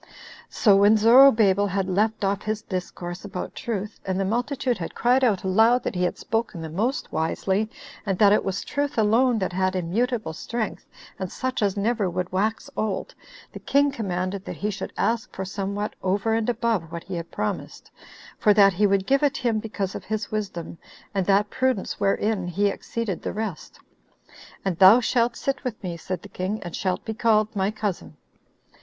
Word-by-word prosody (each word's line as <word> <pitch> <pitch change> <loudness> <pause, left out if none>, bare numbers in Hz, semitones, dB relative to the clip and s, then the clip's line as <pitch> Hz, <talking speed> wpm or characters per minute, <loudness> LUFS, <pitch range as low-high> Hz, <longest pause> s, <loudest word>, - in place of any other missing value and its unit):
5 - - -23
7. - - -18 0.3
So 205 -4 +4
when 205 +2 +6
Zorobabel 220 -4 +6
had 190 0 -1
left 210 +3 0
off 195 +1 0
his 215 0 -3
discourse 180 -1 -5
about 195 -3 -6
truth, 210 -2 -4
and 190 0 -2
the 195 - +1
multitude 245 +3 -1
had 165 - -6
cried 250 +3 +3
out 210 -6 +2
aloud 225 +6 +4
that - - -2
he 180 - -2
had 180 - 0
spoken 225 -5 -2
the 160 -1 -6
most 225 - -1
wisely, 190 +6 0 0.3
and 195 -3 -1
that 205 0 +6
it - - +2
was 195 0 -2
truth 285 -2 -2
alone 230 +3 +3
that 190 -3 -2
had 185 +1 0
immutable 205 +1 -1
strength, 220 +6 -4 0.3
and 190 -2 -4
such 260 -2 -3
as 205 -1 +1
never 210 -1 +1
would 180 +1 -3
wax 210 +4 -1
old, 215 -3 -2 0.4
the - - -7
king 285 +1 +2
commanded 190 -5 -3
that - - -5
he 210 +1 -2
should 200 - -6
ask 230 -1 0
for 190 - -4
somewhat 200 +2 -3
over 200 +4 0
and 225 +1 0
above 225 -8 -1
what 170 0 -6
he 190 - -8
had 170 -1 -5
promised, 105 - -4 0.5
for 210 -1 +4
that 200 -2 +6
he 205 +3 +3
would 195 -1 +1
give 275 +4 +3
it 295 +1 +2
him 235 -4 0
because 205 -3 -4
of - - -7
his 215 -1 -3
wisdom, 190 -6 -4 0.3
and 195 -3 -1
that 200 +1 +3
prudence 260 -6 -1
wherein 200 -1 0
he 200 +4 +1
exceeded 220 -3 -4
the - - -4
rest; 210 -7 -5 0.9
"and 185 -4 -1
thou 195 +5 +9
shalt 240 -1 +1
sit 275 0 -2
with 245 -4 -3
me," 175 -2 -3
said 175 +1 -5
the - - -9
king, 190 +4 -3
"and 175 -2 -6
shalt 185 -2 -2
be 220 - -3
called 215 -1 +2
my 195 0 +1
cousin." 205 -7 -4
205 Hz, 195 wpm, -24 LUFS, 190-225 Hz, 0.9 s, thou